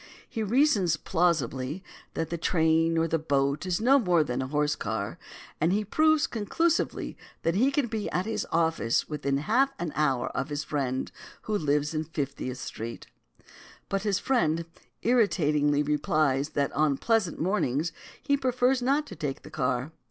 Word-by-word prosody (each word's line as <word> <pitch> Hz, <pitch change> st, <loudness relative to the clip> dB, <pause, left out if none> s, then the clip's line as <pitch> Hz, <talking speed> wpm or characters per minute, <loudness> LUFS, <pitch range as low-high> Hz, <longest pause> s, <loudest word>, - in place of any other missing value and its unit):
He 230 Hz, -3 st, -4 dB
reasons 215 Hz, -, +3 dB
plausibly 160 Hz, -2 st, 0 dB, 0.3 s
that 165 Hz, 0 st, -2 dB
the 170 Hz, -, -1 dB
train 165 Hz, -1 st, +2 dB
or 165 Hz, 0 st, +2 dB
the 165 Hz, 0 st, 0 dB
boat 140 Hz, +1 st, 0 dB
is 180 Hz, -1 st, 0 dB
no 265 Hz, +5 st, +5 dB
more 175 Hz, -8 st, +3 dB
than 125 Hz, -3 st, -3 dB
the 130 Hz, -, -2 dB
horse 150 Hz, +1 st, +1 dB
car, -, -, -4 dB, 0.4 s
and 165 Hz, +3 st, +2 dB
he 210 Hz, +2 st, +1 dB
proves 310 Hz, +6 st, +3 dB
conclusively 315 Hz, -, -1 dB, 0.3 s
that 165 Hz, -, +2 dB
he 240 Hz, +9 st, +3 dB
can 280 Hz, -1 st, +1 dB
be 220 Hz, -3 st, -3 dB
at 180 Hz, +1 st, -1 dB
his 225 Hz, -, -2 dB
office 160 Hz, -8 st, +1 dB
within 140 Hz, -2 st, -1 dB
half 260 Hz, -, +2 dB
an 170 Hz, -3 st, -4 dB
hour 135 Hz, -4 st, +1 dB
of 135 Hz, +3 st, -3 dB
his 145 Hz, +1 st, -2 dB
friend 135 Hz, -4 st, -2 dB, 0.3 s
who 215 Hz, -, -2 dB
lives 150 Hz, -3 st, +1 dB
in 155 Hz, 0 st, -1 dB
Fiftieth 140 Hz, -4 st, -4 dB
Street. 115 Hz, -2 st, -6 dB, 0.8 s
But 195 Hz, 0 st, 0 dB
his 205 Hz, -2 st, +1 dB
friend 170 Hz, -9 st, +1 dB, 0.4 s
irritatingly 150 Hz, -11 st, +2 dB
replies 150 Hz, -1 st, +1 dB
that 140 Hz, -1 st, +1 dB
on 150 Hz, -2 st, +2 dB
pleasant 220 Hz, -5 st, +1 dB
mornings 165 Hz, -4 st, 0 dB, 0.3 s
he 280 Hz, -, +2 dB
prefers 255 Hz, -1 st, +1 dB
not 280 Hz, +4 st, +2 dB
to -, -, -9 dB
take 145 Hz, -4 st, -4 dB
the -, -, -12 dB
car. 125 Hz, +3 st, -1 dB
165 Hz, 165 wpm, -27 LUFS, 145-215 Hz, 0.8 s, no